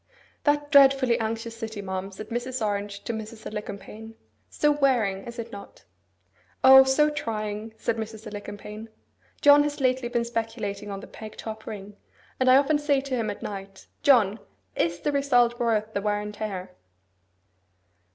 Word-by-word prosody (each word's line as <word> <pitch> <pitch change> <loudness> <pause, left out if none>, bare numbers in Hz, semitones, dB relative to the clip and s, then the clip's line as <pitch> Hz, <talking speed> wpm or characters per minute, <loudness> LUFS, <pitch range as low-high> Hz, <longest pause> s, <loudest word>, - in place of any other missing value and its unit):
'That 290 0 +1
dreadfully 270 -3 +6
anxious 225 +1 -3
city, 225 -2 -6
ma'am,' 190 0 -4
said 210 +2 -9
Mrs. 240 0 -2
Orange 200 -1 -3
to 235 - -3
Mrs. 220 0 -7
Alicumpaine; 210 +1 -7 0.3
'so 295 - +2
wearing, 245 -10 +1
is 235 +1 -8
it 230 - -6
not?' 200 0 -11 0.8
'O, 265 0 +10
so 265 +3 +3
trying!' 215 -4 -4
said 230 0 -1
Mrs. 220 0 -6
Alicumpaine. 210 +1 -8 0.5
'John 290 0 +8
has 290 0 -2
lately 255 -2 +1
been 240 -1 0
speculating 220 -3 -4
in 195 -1 -5
the - - -9
peg 215 -1 -11
top 220 -1 -7
ring; 205 -1 -8 0.4
and 255 0 +3
I 255 - +8
often 285 +2 +3
say 290 -2 +2
to 270 -1 -3
him 225 -3 -1
at 205 - -6
night, 195 -1 -7 0.2
"John, 230 -7 +4 0.4
is 170 +1 0
the 295 - 0
result 245 -4 +2
worth 220 -2 0
the 200 - -1
wear 205 0 0
and 210 0 -6
tear?" 190 -4 -5
225 Hz, 160 wpm, -26 LUFS, 205-260 Hz, 0.8 s, O